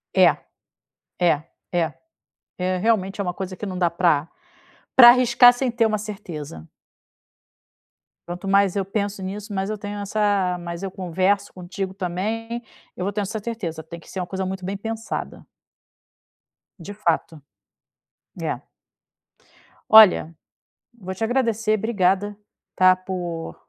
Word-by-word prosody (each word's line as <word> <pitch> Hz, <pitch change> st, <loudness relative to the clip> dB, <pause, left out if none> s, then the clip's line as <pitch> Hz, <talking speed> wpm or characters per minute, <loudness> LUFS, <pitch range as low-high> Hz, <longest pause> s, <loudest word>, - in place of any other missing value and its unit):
É -, -, +5 dB, 0.8 s
é 165 Hz, -4 st, +3 dB, 0.3 s
é 165 Hz, -3 st, 0 dB, 0.7 s
é 185 Hz, 0 st, 0 dB
realmente 200 Hz, -1 st, 0 dB
é -, -, 0 dB
uma 180 Hz, -1 st, -3 dB
coisa 190 Hz, -1 st, -5 dB
que 210 Hz, -, -6 dB
não 185 Hz, -2 st, -5 dB
dá 175 Hz, -2 st, +2 dB
pra 170 Hz, -3 st, +2 dB, 0.7 s
pra 240 Hz, -2 st, +11 dB
arriscar 245 Hz, 0 st, +7 dB
sem 250 Hz, +1 st, -1 dB
ter 230 Hz, -1 st, +1 dB
uma 215 Hz, -1 st, +1 dB
certeza. 160 Hz, -, -8 dB, 1.6 s
Quanto 175 Hz, +2 st, -6 dB
mais 195 Hz, -1 st, +3 dB
eu 195 Hz, -, 0 dB
penso 200 Hz, -1 st, -3 dB
nisso 205 Hz, +2 st, -6 dB
mais 195 Hz, +1 st, -2 dB
eu 215 Hz, -, -3 dB
tenho 205 Hz, 0 st, -6 dB
essa 200 Hz, -3 st, 0 dB
mais 170 Hz, +1 st, -6 dB
eu 195 Hz, -, -3 dB
converso 190 Hz, +2 st, 0 dB
contigo 190 Hz, +1 st, -5 dB
também. 215 Hz, +6 st, -3 dB, 0.3 s
Eu 180 Hz, -, -4 dB
vou 200 Hz, -, -1 dB
tendo 205 Hz, 0 st, -2 dB
essa 220 Hz, +3 st, -4 dB
certeza 180 Hz, -9 st, -5 dB
tem 170 Hz, +1 st, -10 dB
que -, -, -17 dB
ser 190 Hz, -, -5 dB
uma 180 Hz, -, -4 dB
coisa 190 Hz, 0 st, -3 dB
muito 190 Hz, 0 st, -5 dB
bem 195 Hz, +2 st, -3 dB
pensada. 225 Hz, +2 st, -5 dB, 1.3 s
De 195 Hz, +4 st, -8 dB
fato, 165 Hz, -5 st, -1 dB, 1.0 s
é. -, -, -3 dB, 1.3 s
Olha 200 Hz, -7 st, +7 dB, 0.6 s
vou 190 Hz, -1 st, -6 dB
te 205 Hz, +4 st, -5 dB
agradecer 225 Hz, -3 st, +1 dB
obrigada, 205 Hz, -1 st, +1 dB, 0.4 s
tá, 185 Hz, 0 st, +6 dB
por 180 Hz, -3 st, -5 dB
195 Hz, 140 wpm, -23 LUFS, 180-215 Hz, 1.6 s, pra